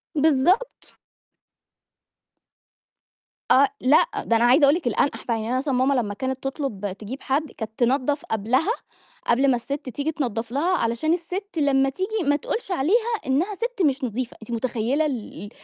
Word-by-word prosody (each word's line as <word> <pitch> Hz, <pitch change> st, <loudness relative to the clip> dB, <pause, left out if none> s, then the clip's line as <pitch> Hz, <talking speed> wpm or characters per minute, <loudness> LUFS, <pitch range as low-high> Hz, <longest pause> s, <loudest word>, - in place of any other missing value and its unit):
بالضبط. 320 Hz, -, +1 dB, 2.6 s
آه، 275 Hz, +1 st, +6 dB
لأ، 285 Hz, -, +5 dB, 0.2 s
ده 230 Hz, -, +2 dB
أنا 230 Hz, -, +3 dB
عايزة 265 Hz, +5 st, +5 dB
أقُول 280 Hz, +2 st, +6 dB
لِك 335 Hz, -7 st, -3 dB
الانقح 240 Hz, +5 st, 0 dB
بقى، 230 Hz, -, 0 dB
يعني 220 Hz, +1 st, -4 dB
أنا 255 Hz, -, +1 dB
مثلًا 275 Hz, 0 st, -1 dB
ماما 260 Hz, +2 st, +2 dB
لمّا 220 Hz, -6 st, 0 dB
كانت 260 Hz, +3 st, -4 dB
تطلب 265 Hz, -8 st, -3 dB
تجيب 230 Hz, +6 st, -7 dB
حد، 290 Hz, +3 st, -1 dB
كانت 220 Hz, -1 st, -6 dB
تنضّف 270 Hz, +4 st, +1 dB
قبلها، 245 Hz, -, +1 dB, 0.6 s
قبل 265 Hz, +3 st, +3 dB
ما -, -, +3 dB
السِت 270 Hz, +3 st, -5 dB
تيجي 285 Hz, +6 st, -2 dB
تنضّف 235 Hz, -6 st, -3 dB
لها 340 Hz, +7 st, +1 dB
علشان 235 Hz, +8 st, 0 dB
السِت 360 Hz, +2 st, -4 dB
لمّا 270 Hz, -2 st, +3 dB
تيجي 375 Hz, +2 st, -2 dB
ما 290 Hz, -, +4 dB
تقولش 400 Hz, +6 st, -4 dB
عليها 440 Hz, -, +2 dB
إنها 330 Hz, +11 st, 0 dB
سِت 470 Hz, -1 st, -3 dB
مش 275 Hz, 0 st, 0 dB
نضيفة، 245 Hz, +1 st, -3 dB
أنتِ 235 Hz, -, -10 dB
متخيّلة 245 Hz, +5 st, 0 dB
ال 250 Hz, -7 st, -4 dB
ال 205 Hz, -, -8 dB
270 Hz, 165 wpm, -24 LUFS, 240-315 Hz, 2.6 s, آه